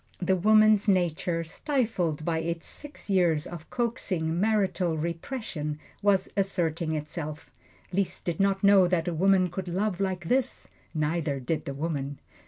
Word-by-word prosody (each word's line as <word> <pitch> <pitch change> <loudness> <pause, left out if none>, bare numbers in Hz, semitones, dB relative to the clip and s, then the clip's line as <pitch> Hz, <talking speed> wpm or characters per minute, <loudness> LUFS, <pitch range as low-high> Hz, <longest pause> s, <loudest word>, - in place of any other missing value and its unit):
The 190 +1 +1
woman's 215 +2 +5
nature, 175 -3 +1
stifled 180 - -1
by 165 -2 0
its 165 0 -3
six 295 -6 -8
years 175 -6 +2
of 170 -3 -9
coaxing 185 -9 -1
marital 195 -5 +1
repression, 165 - -4 0.2
was 200 -2 +3
asserting 170 -5 0
itself. 155 0 -5 0.4
Liszt 195 0 -1
did 170 -2 -2
not 195 0 +2
know 195 -2 +7
that 175 -2 0
a 175 - 0
woman 185 +2 +4
could 185 +1 -5
love 190 +2 -1
like 185 -3 -2
this 255 +3 0 0.3
neither 155 -2 0
did 150 +4 -2
the 140 - -4
woman. 145 -2 -3
175 Hz, 145 wpm, -28 LUFS, 160-195 Hz, 0.4 s, know